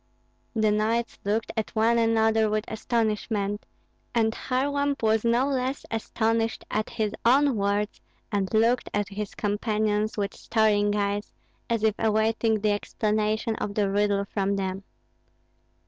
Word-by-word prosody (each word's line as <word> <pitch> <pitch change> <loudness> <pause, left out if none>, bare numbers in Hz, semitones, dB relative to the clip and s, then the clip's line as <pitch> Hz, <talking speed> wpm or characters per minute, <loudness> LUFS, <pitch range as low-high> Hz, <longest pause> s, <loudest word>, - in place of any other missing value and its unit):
The 215 -1 +3
knights 225 +3 0
looked 215 +3 -1
at 220 0 -3
one 230 +2 +3
another 225 -1 +3
with 215 +1 -1
astonishment; 215 -2 -1 0.5
and 220 -1 +2
Kharlamp 280 +2 -1
was 220 0 +3
no 235 +2 +3
less 265 0 -2
astonished 225 0 -1
at 215 0 -1
his 215 -2 -2
own 270 +3 +4
words, 205 +1 -1 0.3
and 200 -2 -1
looked 230 +3 +2
at 205 -2 0
his 205 0 -5
companions 210 0 0
with 200 -1 -1
staring 205 -2 +2
eyes, 205 0 -1 0.4
as 230 -2 0
if 220 -1 +4
awaiting 220 0 +1
the 210 0 +2
explanation 215 +1 0
of 200 - -4
the 200 -2 +1
riddle 200 0 +1
from 200 0 -1
them. 195 0 -3
220 Hz, 135 wpm, -26 LUFS, 205-225 Hz, 0.5 s, own